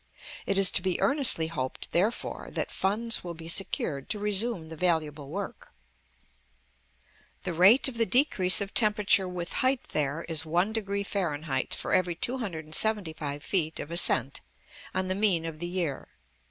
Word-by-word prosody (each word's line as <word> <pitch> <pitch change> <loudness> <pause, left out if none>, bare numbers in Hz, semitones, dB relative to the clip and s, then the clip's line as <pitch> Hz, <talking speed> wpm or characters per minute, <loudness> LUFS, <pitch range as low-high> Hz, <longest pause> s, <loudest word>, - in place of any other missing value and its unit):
It 195 - 0
is 195 -2 +6
to - - +3
be 185 -1 -1
earnestly 275 - +3
hoped, 140 -6 -5
therefore, 200 +7 -2
that - - -3
funds 215 +4 -1
will 175 -1 -7
be 165 0 -10
secured 160 -5 -2
to - - -1
resume 205 -4 0
the 160 - -8
valuable 155 -4 -1
work. 195 +5 -7 1.7
The 185 - -3
rate 190 +12 +6
of 240 -3 -4
the 230 - +3
decrease 210 -9 +4
of 200 0 -4
temperature 210 -3 +3
with 175 -1 -5
height 260 0 0
there 150 +2 -2
is 160 -3 +2
1° 200 +5 -2
Fahr. 155 -9 -3
for - - -3
every 180 -2 +1
275 160 - -2
feet 160 -5 -1
of 150 - -7
ascent, 135 -6 +2 0.5
on 185 0 0
the 185 - 0
mean 190 -5 +2
of 160 -2 -7
the 175 - -4
year. 175 -6 -4
180 Hz, 155 wpm, -27 LUFS, 160-205 Hz, 1.7 s, is